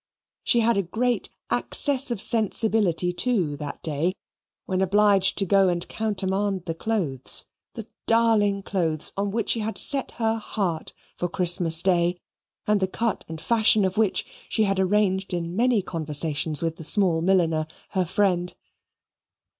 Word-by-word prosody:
She 235 - +2
had 230 -1 +2
a - - +3
great 235 +7 -2 0.2
access 275 -2 +1
of 235 -4 -3
sensibility 210 -5 +2
too 180 -8 0
that 145 -1 -7
day, 160 +4 -1 0.5
when 185 0 -1
obliged 200 0 +3
to 195 - +1
go 195 +1 +3
and 175 -1 -2
countermand 195 -3 -2
the 165 - -3
clothes, 165 - -1 0.3
the 225 - -7 0.2
darling 220 -4 +2
clothes 165 -6 -1
on 200 +1 -1
which 225 +2 -1
she 230 - +1
had 220 +1 -4
set 275 -2 +2
her 225 -1 -1
heart 185 -7 -3 0.2
for 175 - -2
Christmas 170 -2 +3
Day, 175 -1 +1 0.5
and 210 -1 +2
the 190 - 0
cut 225 +4 -3
and 160 -1 -7
fashion 220 +2 +3
of 190 0 -2
which 215 -3 +1 0.2
she 220 - +1
had 195 -2 0
arranged 190 -1 +1
in 170 0 -4
many 235 -2 +2
conversations 155 -2 -2
with 165 -1 -3
a - - -7
small 175 -1 +2
milliner, 165 -4 +1 0.2
her 185 -1 -1
friend. 180 -1 0
190 Hz, 155 wpm, -24 LUFS, 170-215 Hz, 0.5 s, a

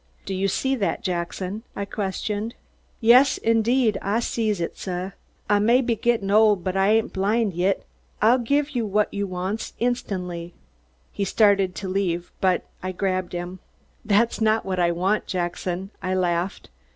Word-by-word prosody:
"Do 195 - -3
you 190 +1 0
see 265 +7 0
that, 195 0 -1
Jackson?" 185 +2 -3
I 200 - -3
questioned. 205 +3 -3 0.5
"Yas, 250 +4 +6
indeed 230 0 +2
Ah 200 +3 0
sees 220 -4 -1
it, 170 - -3
suh! 185 0 -4 0.4
Ah 205 0 +3
may 235 +5 +4
be 240 -3 0
gittin' 225 -3 0
old 210 -3 +5
but 185 -1 -2
Ah 195 0 +3
ain't 220 +2 +2
blind 205 +2 +1
yit. 185 +3 0 0.3
Ah'll 235 +4 +5
giv 280 +5 +1
you 240 -5 -1
whut 210 +1 +2
you 200 0 -2
wants, 185 +4 -4
instan'ly." 180 -8 -2 0.6
He 200 - -2
started 195 -2 +3
to 195 - -5
leave, 180 -2 -1
but 185 -1 +2 0.2
I 185 0 -4
grabbed 185 -1 -1
him. 175 +1 -5 0.4
"That's 225 +2 +2
not 220 0 +2
what 185 -1 -2
I 170 -1 +3
want, 190 +5 0
Jackson," 180 +1 -3
I 185 0 -1
laughed. 180 +1 -1
200 Hz, 165 wpm, -24 LUFS, 185-225 Hz, 0.6 s, Yas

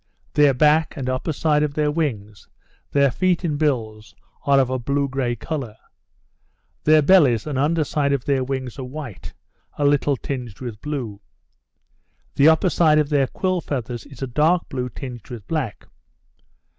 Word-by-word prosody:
Their 145 -3 +4
back, 155 +4 +3
and 135 -2 -4
upper 130 +5 -1
side 150 0 +1
of 150 -1 -1
their 150 -1 +1
wings, 110 - -3 0.4
their 140 -2 +3
feet 185 +5 +1
and 155 -4 0
bills, 110 -8 -2 0.3
are 140 -1 +5
of 130 -1 +1
a 130 - -1
blue 140 +3 0
grey 130 -3 -1
colour. 125 -3 -5 1.1
Their 155 0 +6
bellies, 140 - +5
and 150 - -4
under 155 +3 +2
side 145 -1 0
of 140 -3 -1
their 135 -2 +1
wings 130 -1 -4
are - - -4
white, 130 - -8 0.4
a 145 - 0
little 145 -1 +2
tinged 125 -7 -6
with 120 -4 -7
blue. 125 -9 -5 1.1
The 145 +3 +6
upper 160 +3 +3
side 155 -3 +4
of 150 -2 +2
their 140 -3 +2
quill 185 +3 -1
feathers 125 -5 -5
is 135 -1 -9
a - - +1
dark 155 +7 +2
blue 125 -2 -3
tinged 125 -3 -9
with 115 -5 -8
black. 150 -10 -3
140 Hz, 170 wpm, -22 LUFS, 125-150 Hz, 1.1 s, Their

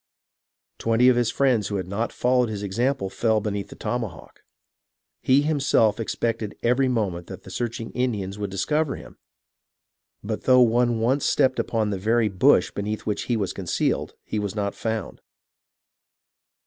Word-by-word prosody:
Twenty 115 +2 +4
of 125 - +4
his 120 -1 +2
friends 125 -5 +2
who 100 - -3
had 95 -2 -3
not 105 +5 -2
followed 125 -1 +2
his 105 -2 -4
example 120 +3 0
fell 110 +2 +1
be 105 0 -3
neath 100 -1 -4
the - - -12
tomahawk. 115 -9 -5 0.8
He 135 +2 +4
himself 135 -8 +2
expected 115 -1 -2
every 125 +3 +3
moment 100 -9 -1
that - - -9
the - - -11
searching 115 -1 -4
Indians 105 -6 -2
would 100 -1 -3
discover 150 +10 0
him, - - -12 1.0
but - - -4
though 125 -1 +6
one 120 0 +3
once 130 +5 +1
stepped 130 -2 +2
upon 110 -2 0
the 95 - -3
very 110 +2 +2
bush 90 -1 +3
beneath 105 +1 -4
which 105 - -2
he 120 - 0
was 100 -4 -2
concealed, - - -1
he 105 - -3
was 105 0 -3
not 100 -1 -1
found. 110 -4 -4
115 Hz, 160 wpm, -24 LUFS, 100-125 Hz, 1.0 s, though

